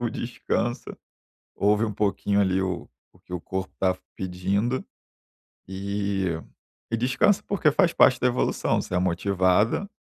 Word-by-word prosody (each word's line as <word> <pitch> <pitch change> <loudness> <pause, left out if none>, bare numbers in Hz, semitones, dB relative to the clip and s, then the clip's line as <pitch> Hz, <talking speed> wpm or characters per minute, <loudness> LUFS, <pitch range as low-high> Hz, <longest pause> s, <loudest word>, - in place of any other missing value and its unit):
o 120 -2 -1
descanso. 120 +1 -3 0.6
Ouve 105 +2 +2
um 105 - -2
pouquinho, 100 0 +1
ali, 95 -1 +2
o 90 -2 -3 0.2
o - - -23
que - - -15
o 85 - -3
corpo 95 +1 -4
está 95 -1 +1 0.2
pedindo, 95 +7 -1 0.9
e 100 0 -2 0.7
e 115 - +1
descansa, 130 - +2
porque 170 -7 +2
faz 175 +2 +3
parte 125 -2 +5
da 125 - +3
evolução, 125 - 0
você - - -8
é - - +3
motivada, 95 - +1
100 Hz, 145 wpm, -25 LUFS, 95-120 Hz, 0.9 s, parte